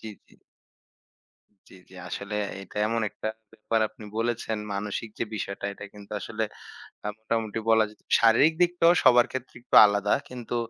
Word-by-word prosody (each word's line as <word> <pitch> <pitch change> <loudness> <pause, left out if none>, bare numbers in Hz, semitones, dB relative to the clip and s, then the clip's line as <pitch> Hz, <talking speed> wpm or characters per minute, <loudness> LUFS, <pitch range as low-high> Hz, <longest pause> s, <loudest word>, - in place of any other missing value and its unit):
জি, 110 - -8 0.2
জি। - - -23 1.3
জ্বী, - - -15
জ্বী। 95 - -17
আসলে 100 +3 -5 0.3
এটা 95 - -15
এমন 115 +1 0
একটা 110 - -5 0.2
ব্যাপার 110 0 -1
আপনি 110 - -14
বলেছেন 115 -1 -1 0.2
মানসিক 105 +3 -4
যে - - 0
বিষয়টা 100 -1 -4
এটা 100 - -10
কিন্তু 105 0 -12
আসলে 110 0 -3 0.6
আ - - -1
মোটামুটি 110 0 -2
বলা 110 0 +6
যেত। 105 - -20 0.2
শারীরিক 120 +8 +5
দিকটাও 175 -1 +4
সবার 125 -2 +6
ক্ষেত্রে 130 -1 -6
একটু - - -2
আলাদা 105 0 +1 0.2
কিন্তু 120 -1 -6
110 Hz, 155 wpm, -26 LUFS, 105-120 Hz, 1.3 s, বলা